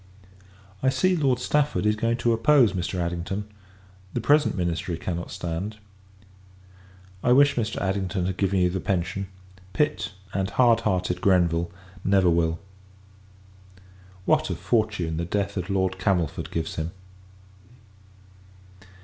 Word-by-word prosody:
I 130 - +3
see, 185 +7 +2
Lord 135 -6 +2
Stafford 145 -1 0
is 105 0 +3
going 115 +2 0
to 120 -1 +2
oppose 120 +1 +4
Mr. 90 0 -3
Addington; 90 +4 -3 0.7
the - - +1
present 145 +3 +3
ministry 85 -1 -2
cannot 85 0 -4
stand. 90 +6 -4 1.5
I 125 - +5
wish 140 +2 +6
Mr. 115 -4 -2
Addington 95 -2 -1
had 95 0 -2
given 95 -1 +1
you 90 0 +3
the 95 - -2
pension; 95 +1 -2 0.5
Pitt, 150 -7 0 0.2
and 95 0 -1
hard 120 -3 +4
hearted 90 -5 -1
Grenville, 85 -3 +2 0.3
never 95 -2 +4
will. 80 -1 +1 1.7
What 155 +4 +2
a - - -1
fortune 105 -8 0
the 85 - -1
death 100 +2 -2
of 90 -1 -3
Lord 95 -1 0
Camelford 90 -6 0
gives 80 -1 -3
him! 80 +1 -3
95 Hz, 130 wpm, -25 LUFS, 90-115 Hz, 1.7 s, wish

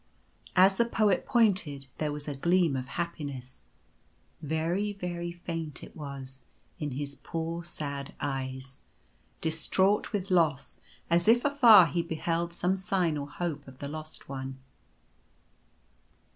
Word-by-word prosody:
As 190 +1 +6
the 235 - +4
Poet 215 -5 +2
pointed 185 - +2
there 150 -1 0
was 145 0 -5
a 145 - -2
gleam 170 +1 +2
of 130 -1 -3
happiness 145 -7 -5 0.4
— - - -38 0.2
very 185 +6 0
very 175 -3 -4
faint 165 -3 -5
it - - -11
was 135 -3 -7 0.2
— - - -37
in 145 -3 -3
his 140 +1 -3
poor 165 +4 -4
sad 140 -4 -5
eyes, 130 -1 -4 0.6
distraught 185 +5 +2
with 195 -3 -2
loss, 160 -7 +2 0.3
as 170 +2 +3
if 240 +3 +5
afar 240 -10 +8
he 170 +2 0
beheld 170 +1 -2
some 180 +2 0
sign 185 -4 +1
or 145 -1 -4
hope 150 -3 -4
of 130 -1 -12
the 140 - -5
Lost 155 +1 -6
One. 135 -1 -5
165 Hz, 140 wpm, -29 LUFS, 140-180 Hz, 0.6 s, afar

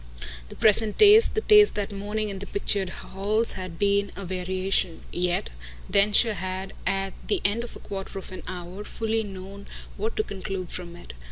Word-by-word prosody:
The - - -10
present 215 0 +3
taste, 425 +2 +7
the 435 - +1
taste 420 -1 +6
that 205 0 -2
morning 210 +2 -3
in 195 -1 -5
the 200 - -7
pictured 200 -1 0
halls, 210 +5 -1
had 185 -3 -6
been 200 +1 +2
a 200 - -6
variation; 185 -1 -2
yet 175 - 0 0.4
Densher 210 +3 +4
had 190 0 -4
at 195 0 0
the 410 - +1
end 220 +4 +1
of 240 - -8
a - - -9
quarter 195 -1 -6
of 190 - -8
an 185 - -7
hour 180 +2 -6
fully 225 +1 -1
known 195 0 -8 0.3
what 220 +3 -3
to 215 - +2
conclude 190 -3 -5
from 175 -1 -6
it. 175 - -11
195 Hz, 180 wpm, -26 LUFS, 185-210 Hz, 0.4 s, taste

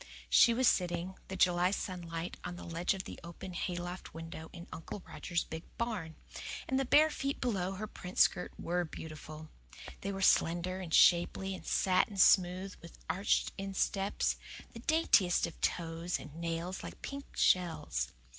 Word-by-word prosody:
She 235 - +7
was 250 +2 +3
sitting, 175 0 +1
the 190 - -5
July 180 -1 +4
sunlight, 175 -3 -4
on 180 0 -5
the - - -9
ledge 170 +3 -1
of 190 - -5
the - - -9
open 175 +2 -8
hayloft 175 -1 -4
window 165 0 -7
in 170 -1 -9
Uncle 165 +4 -7
Roger's 170 -1 -2
big 160 0 -6 0.2
barn; 210 -9 -3 0.5
and 265 - +1
the 270 - +1
bare 305 +4 +5
feet 275 0 -2
below 195 -7 -1
her 205 +3 -4
print 180 -3 -9
skirt 180 - +4
WERE 175 +1 -1
beautiful. 155 -1 -9 0.5
They 200 - -2
were 195 0 -3
slender 175 +2 +3
and 180 -4 -6
shapely 180 +3 +4
and 185 - -9
satin 190 +2 +2
smooth 185 +1 +4
with 170 - -12
arched 195 +2 +1
insteps, 195 0 0 0.4
the 230 - -8
daintiest 230 - +3
of 170 - -9
toes, 165 0 -1
and 145 - -10
nails 170 +3 -3
like - - -9
pink 280 0 -7
shells. 85 - +2
180 Hz, 160 wpm, -33 LUFS, 170-195 Hz, 0.5 s, She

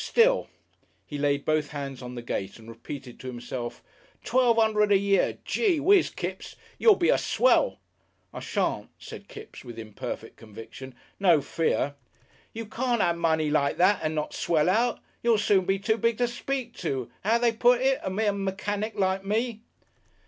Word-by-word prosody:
Still - - +3 0.3
" - - -41
He 145 - -6
laid 140 -1 0
both 155 -1 +1
hands 140 -3 -6
on 125 0 -7
the 120 - -6
gate 95 -4 -4
and 115 -1 -15
repeated 120 +2 -9
to 130 - -8
himself, 120 -1 -6 0.4
"Twelve 245 -2 +3
'undred 210 -2 +3
a 200 - +7
year.... 200 0 +1
Gee 390 -8 +1
Whizz, 375 +5 +4
Kipps! - - -5 0.2
You'll 440 -3 +6
be 345 - +1
a - - +4
swell!" - - +2 0.6
"I - - -6
shan't," - - -2
said - - -10
Kipps 430 +1 -11
with 120 -3 -10
imperfect 115 +1 -7
conviction. 115 +4 -11 0.2
"No 175 -6 +5
fear." 145 -1 -1 0.6
"You 230 0 -6
can't 240 +2 -1
'ave 170 -1 0
money 160 -2 +1
like 140 -2 +1
that 190 +3 +4
and 155 0 -2
not 150 -1 -3
swell 160 0 +1
out. 235 +4 +1 0.2
You'll 235 -2 +3
soon 200 -2 +2
be 195 +1 +1
too 220 +3 0
big 230 -1 +1
to 245 - +2
speak 245 0 -4
to 135 -8 -3
'ow 220 +4 +3
do - - -6
they 240 -1 +4
put 240 +2 +3
it? 265 0 +2
a - - -2
mere 205 +2 +1
mechanic 205 +2 -3
like 190 -1 +1
me." 220 +2 -1
195 Hz, 180 wpm, -27 LUFS, 140-235 Hz, 0.6 s, a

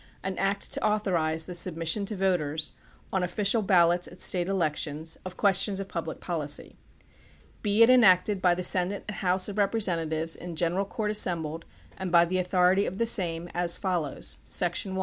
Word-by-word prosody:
AN 190 0 -3
ACT 195 +1 -1
TO - - -3
AUTHORIZE 175 -7 0
THE 180 - -7
SUBMISSION 175 +3 -1
TO 215 - -4
VOTERS, 160 -5 -1 0.4
ON 190 - +1
OFFICIAL 200 +5 0
BAL 180 -4 +4
LOTS 175 +1 0
AT - - -14
STATE 180 -1 +2
ELECTIONS, 160 -3 -2
OF 185 0 -8
QUESTIONS 195 0 +2
OF 195 - -5
PUBLIC 165 -4 -5
POLICY. 150 -4 -3 0.9
Be 210 +1 +4
it 230 - +5
enacted 205 -4 +4
by 180 -1 +3
the 180 - -4
senate 185 +2 +1
and 210 - -6
house 185 0 +1
of 205 0 -5
representatives 165 -6 0
in 175 -1 -8
general 175 +4 0
court 210 +1 -3
assembled, 165 -6 -1 0.3
and 190 -2 -4
by 170 0 +6
the 185 +2 -1
authority 185 +2 +2
of 190 - -5
the 230 - +1
same, 175 -6 +1
as 175 -1 +1
follows: 175 -7 -2
Section 180 +2 0
1. - - -2
180 Hz, 180 wpm, -27 LUFS, 170-195 Hz, 0.9 s, by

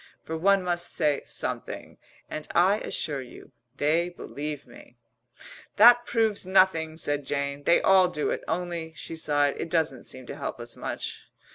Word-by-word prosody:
(for 160 - -5
one 195 +3 +3
must 175 -1 -1
say 150 -3 +1
something) - - -5 0.3
and 155 - -6
I 190 +5 +4
assure 145 -3 -2
you, 125 - -13 0.3
they 165 +5 +2
believe 150 -4 -6
me." 120 -1 -16 0.8
"That 240 +3 +7
proves 220 -3 +1
nothing," 185 -4 +3
said 145 -2 -2
Jane. 140 +1 -3
"They 170 - +5
all 190 -1 +6
do 150 -4 -2
it. - - -3
Only," 170 -2 -3
she 165 - -7
sighed, 145 -3 +1
"it - - -4
doesn't 160 -6 0
seem 130 -1 -7
to - - -7
help - - -5
us - - -5
much. - - -6
160 Hz, 160 wpm, -27 LUFS, 145-180 Hz, 0.8 s, That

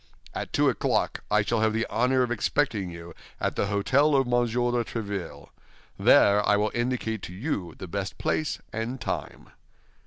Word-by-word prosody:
At - - -5
two - - +3
o'clock - - 0
I 105 0 +3
shall 115 +2 0
have 110 0 +2
the 115 +1 0
honor 130 +2 +2
of 120 - -2
expecting 115 -5 0
you 85 0 -9 0.3
at - - -1
the - - +1
hôtel 135 +9 +3
of 135 - +1
Monsieur 120 0 +1
de 120 -1 +1
Tréville. 100 -11 -5 0.5
There 100 +1 +5
I 105 - +3
will 105 +1 0
indicate 120 -3 -1
to 90 - -7
you 95 - -3
the 95 - -7
best 100 +2 -4
place 155 - -1 0.2
and 115 +4 -3
time." 120 - -5
115 Hz, 175 wpm, -26 LUFS, 100-125 Hz, 0.5 s, There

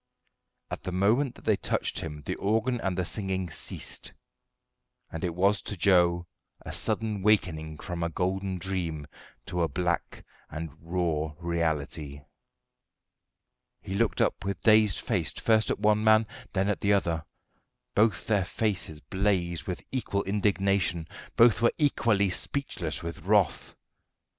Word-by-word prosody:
At - - -4
the 90 - -4
moment 110 +9 +2
that - - -16
they - - +3
touched - - -1
him 75 -2 -6
the - - -1
organ 115 +4 0
and 95 -1 -1
the 90 - 0
singing 95 -3 -3
ceased; - - -3 1.0
and 80 - -5
it 85 -2 -1
was 100 +2 +3
to 105 - -4
Joe 85 -2 +4 0.4
a - - -7
sudden 110 -3 -1
wakening 80 -7 +1
from 85 +1 -5
a 85 - 0
golden 95 +2 -1
dream 85 -5 -2 0.4
to 90 - -2
a 85 - +3
black 85 0 -2 0.2
and 80 0 -5
raw 80 -3 -1
reality. 80 -4 -2 1.6
He 95 - -7
looked 110 +2 +1
up - - +1
with 100 0 -3
dazed 110 -4 +5
face - - -1
first 110 -1 +2
at - - 0
one 105 0 +3
man, 110 0 +5 0.3
then 95 0 +1
at 105 - -1
the 100 0 +3
other: 85 -5 +1 0.7
both 105 -3 +2
their 105 -3 +2
faces 90 -8 -2
blazed 95 -4 0
with 90 - -4
equal 110 -6 -1
indignation; 100 -4 +1 0.3
both 120 0 +6
were 120 - +4
equally 115 - +2
speechless 90 - -3
with 85 -1 -5
wrath. 100 -5 +1
95 Hz, 145 wpm, -28 LUFS, 85-105 Hz, 1.6 s, both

